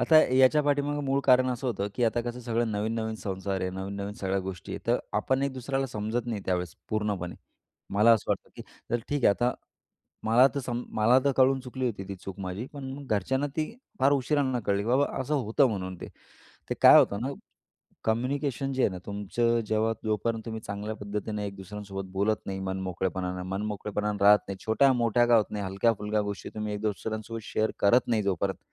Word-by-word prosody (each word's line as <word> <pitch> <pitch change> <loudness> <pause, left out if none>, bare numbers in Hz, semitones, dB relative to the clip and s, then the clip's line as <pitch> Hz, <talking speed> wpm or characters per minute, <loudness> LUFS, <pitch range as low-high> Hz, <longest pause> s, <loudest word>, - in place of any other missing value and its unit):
आता 160 - +5 0.2
याच्या 130 +3 +5
पाठीमागं 145 0 0
मूळ 135 0 +1
कारण 130 -1 +5
असं 125 +2 -3
होतं 100 -4 -1
की 120 - +1
आता 115 +1 +1
कसं 120 +1 -5
सगळं 115 -1 -1
नवीन-नवीन 110 +1 -2
संसार 95 -2 -3
आहे. 95 - -1
नवीन-नवीन 100 +2 -5
सगळ्या 95 -1 -1
गोष्टी 95 -2 -7
आहे. - - -4
तर - - +3 0.2
आपण 130 +1 +1
एक 140 -1 0
दुसऱ्याला 135 +1 -2
समजत 110 +1 -3
नाही, 110 -4 -2
त्यावेळेस 90 -2 -1 0.2
पूर्णपणे. 105 -5 -2 0.6
मला 105 +3 +6
असं 110 - +1
वाटतं - - -1
की - - -7 0.3
तर 120 - +2
ठीक 145 -3 -1
आहे - - +7
आता 120 +1 +1 0.7
मला 120 +4 +6
तर 140 - -1
सम 120 -1 -3
मला 115 +4 +5
तर 140 - +3
कळून 130 0 +4
चुकली 130 0 -3
होती 100 -4 -3
ती 100 - -4
चूक 95 +1 -9
माझी. 95 +6 -4
पण 140 0 -7
घरच्यांना 130 +7 0
ती 155 -1 -1 0.3
फार 140 +2 +5
उशिरांना 135 -2 +1
कळली 100 0 +1
की 110 - -4
बाबा 135 +4 +4
असं 140 +4 -1
होतं 130 +1 +3
म्हणून 95 -4 -4
ते. - - -6 0.6
ते - - +1
काय - - +10
होतं 100 - +3
ना 130 - -2 0.8
कम्युनिकेशन 135 +3 -1
जे 130 - +1
आहे - - +3
ना 90 - -6
तुमचं 115 +4 0
जेव्हा 110 +1 +1
जोपर्यंत 110 +1 -1
तुम्ही 110 -1 -4
चांगल्या 105 +2 -4
पद्धतीनं 105 +1 -4
एक 100 -1 -4
दुसऱ्यांसोबत 95 0 -7
बोलत 105 +3 +1
नाही, 95 -1 -3
मन 95 0 -3
मोकळेपणानं 90 0 -2
मनमोकळेपणानं 105 +1 -2
राहत 105 +1 +8
नाही. 100 - -4
छोट्या-मोठ्या 120 0 +3
का 120 -1 +6
होत 110 - +4
नाही. 105 -1 -3
हलक्या-फुलक्या 105 +2 +1
गोष्टी 100 -1 -5
तुम्ही 105 -1 -3
एक 105 - -4
दुसऱ्यांसोबत 110 +2 -3
शेअर 110 0 0
करत 120 +5 +4
नाही 110 -3 +2
जोपर्यंत, 95 0 -1
110 Hz, 195 wpm, -28 LUFS, 100-125 Hz, 0.8 s, काय